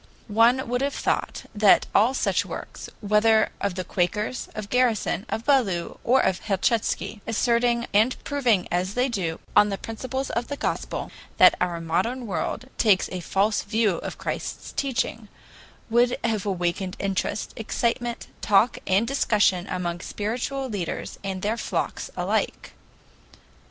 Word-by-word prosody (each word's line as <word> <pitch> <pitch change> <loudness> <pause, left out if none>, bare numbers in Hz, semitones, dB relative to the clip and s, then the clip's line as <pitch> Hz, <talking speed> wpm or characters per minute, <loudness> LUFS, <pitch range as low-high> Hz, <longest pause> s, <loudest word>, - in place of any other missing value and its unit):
One 235 +5 +3
would 245 +2 -1
have 280 +1 -1
thought - - -1
that 205 -2 +5
all 230 +6 +4
such - - +1
works, - - -8
whether 215 +1 +3
of 200 -3 -1
the 185 - -3
Quakers, 210 +7 -1
of 210 -1 -6
Garrison, 240 -3 +1
of 225 - -3
Ballou, 215 -12 +1
or 260 +3 +4
of 185 - +1
Helchitsky, 215 +1 -1
asserting 235 +1 +2
and 220 +5 +3
proving 245 -10 +1
as 180 +3 -1
they 250 +2 +2
do, 175 -8 -2 0.2
on 210 0 +6
the 195 - -2
principles 260 +5 -4
of 235 +1 -2
the 285 - -4
Gospel, - - -3 0.3
that - - +8
our 175 -2 0
modern 230 +10 -1
world 210 +5 -3
takes 205 -4 +4
a 185 - -3
false 195 +5 +1
view 215 -3 +1
of - - -6
Christ's - - -5
teaching, 250 -5 -2 0.6
would 240 +2 +3
have 215 -3 0
awakened 185 0 -1
interest, 195 +1 -2
excitement, 235 +2 -2 0.2
talk, 210 +4 +3
and 195 +5 +3
discussion 210 -8 +2
among 175 -2 -3
spiritual 245 +8 -3
teachers 190 -5 -4
and 190 -1 -4
their 215 +3 0
flocks - - -3
alike. - - -1
215 Hz, 145 wpm, -25 LUFS, 195-240 Hz, 0.6 s, that